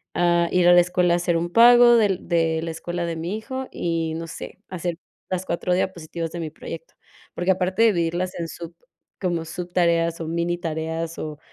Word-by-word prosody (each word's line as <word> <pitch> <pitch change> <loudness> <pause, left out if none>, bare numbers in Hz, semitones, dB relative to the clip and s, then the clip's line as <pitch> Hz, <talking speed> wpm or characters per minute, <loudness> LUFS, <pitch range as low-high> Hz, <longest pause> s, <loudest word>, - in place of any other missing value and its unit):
ah, 170 -1 +2
ir 180 -1 +3
a 175 - +8
la 175 - +8
escuela 180 0 +1
a - - +3
hacer 175 -1 0
un 170 +1 -3
pago 240 +2 +7
del 205 -7 +1
de 165 -2 +1
la 165 - -3
escuela 175 +1 -4
de 170 - -3
mi 170 +6 -3
hijo 260 +4 -5
y, 165 -2 -2
no 165 +1 -5
sé, 170 - -9
hacer 175 -2 -3 0.3
las 185 0 -2
4 175 +1 -1
diapositivas 170 -3 -3
de 175 - -6
mi 155 - -4
proyecto. - - -9 0.4
Porque, 175 +2 +1
aparte 185 +3 +1
de - - +7
dividirlas 175 +1 -1
en 165 - -3
sub 170 0 -9 0.5
como 175 -3 -1
subtareas 170 -1 0
o 165 - -4
minitareas, 165 -1 -3
o 150 -1 -6
175 Hz, 195 wpm, -23 LUFS, 165-180 Hz, 0.5 s, a